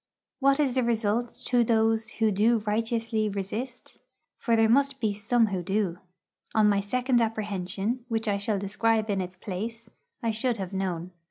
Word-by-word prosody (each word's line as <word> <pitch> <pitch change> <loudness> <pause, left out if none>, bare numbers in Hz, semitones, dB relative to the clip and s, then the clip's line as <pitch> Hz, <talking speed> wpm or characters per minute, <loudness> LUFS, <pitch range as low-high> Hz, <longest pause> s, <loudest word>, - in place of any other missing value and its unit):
What 275 +1 +3
is 275 -4 +2
the 255 0 +1
result 230 0 0
to 245 -1 +3
those 225 0 +2
who 220 -1 +3
do 220 +4 +3
righteously 225 0 0
resist? 215 +6 -5 0.4
For 235 -2 +2
there 225 0 +4
must 275 +3 +3
be 215 -4 0
some 225 +3 +2
who 185 - -1
do. 190 -1 -1 0.6
On 215 -1 +5
my 200 -1 +3
second 245 +4 +1
apprehension, 210 +1 -2
which 225 -1 -2
I 200 -1 +1
shall 205 +1 -1
describe 215 +2 +1
in 195 -1 0
its 180 0 -6
place, 225 +3 -6 0.3
I 230 - +1
should 230 +2 0
have 190 -1 -5
known. 185 -2 -3
220 Hz, 170 wpm, -27 LUFS, 200-235 Hz, 0.6 s, On